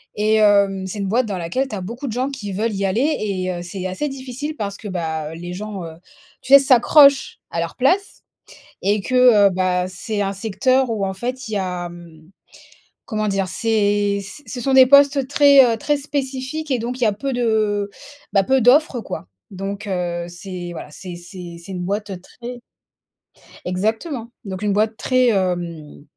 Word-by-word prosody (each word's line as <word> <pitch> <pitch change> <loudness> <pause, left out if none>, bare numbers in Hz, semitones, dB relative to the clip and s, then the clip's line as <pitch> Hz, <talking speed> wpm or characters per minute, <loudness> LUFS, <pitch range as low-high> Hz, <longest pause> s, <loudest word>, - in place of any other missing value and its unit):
Et 215 +1 +2
hem, 200 -3 +3
c'est 205 +2 -6
une 195 - -2
boîte 235 +6 +2
dans 200 -4 -4
laquelle 180 +11 -2
tu 215 - -5
as 190 - -5
beaucoup 235 +9 -6
de 230 - -3
gens 255 +4 -1
qui 220 -8 -6
veulent 215 +3 -1
y 195 0 -1
aller 245 +11 +1
et 185 -3 -2
heu, 175 - -5
c'est 180 +2 -6
assez 290 +11 -3
difficile 270 +3 -6
parce 200 -2 -3
que, 210 - -8
bah, 160 -4 -3
les 175 +2 -7
gens, 200 -1 -6
heu, 160 - -8 0.5
tu 265 - -8
sais, 280 - +12
s'accrochent 275 +2 +5
à 170 - -2
leur 165 - -4
place 370 +11 +1 0.6
et 205 +1 +1
que, 255 +6 -3 0.3
heu, - - +3
bah, 180 -1 0
c'est 205 +3 -4
un 195 0 -1
secteur 235 +6 +1
où 215 -3 -2
en 190 - -3
fait 255 +5 -4
il 220 - -6
y - - +1
a, 180 -2 -3
hem, 170 -2 -14 0.8
comment 215 -2 -2
dire? 195 -1 0
C'est 205 0 +1
c 290 +9 -10
ce 255 - -6
sont 270 +2 0
des 260 -1 +8
postes 280 0 +5
très, 285 -1 +7
heu, - - -3
très 295 +6 0
spécifiques 280 +1 -4
et 255 - +1
donc 245 +3 -4
il - - 0
y - - +5
a 210 - +1
peu 270 +7 -4
de 215 -4 0 0.4
bah, 195 - +4
peu 265 +6 +2
d'offres 255 +1 +4
quoi. 90 - -7 0.2
Donc, 200 +2 -5
heu, 175 -2 -2
c'est 175 0 -7
voilà, 155 - -8
c'est 180 +3 -8
c'est 175 0 -9
c'est 195 - -9
une 180 -1 -4
boîte, 205 +2 -3
heu, 190 -2 -6
très 240 +5 -10 1.0
Exactement. 225 - -2 0.2
Donc 190 0 -6
une 205 -1 0
boîte 215 +1 +1
très, 255 -1 +2
hem, 175 -7 -2
205 Hz, 200 wpm, -20 LUFS, 185-255 Hz, 1.0 s, sais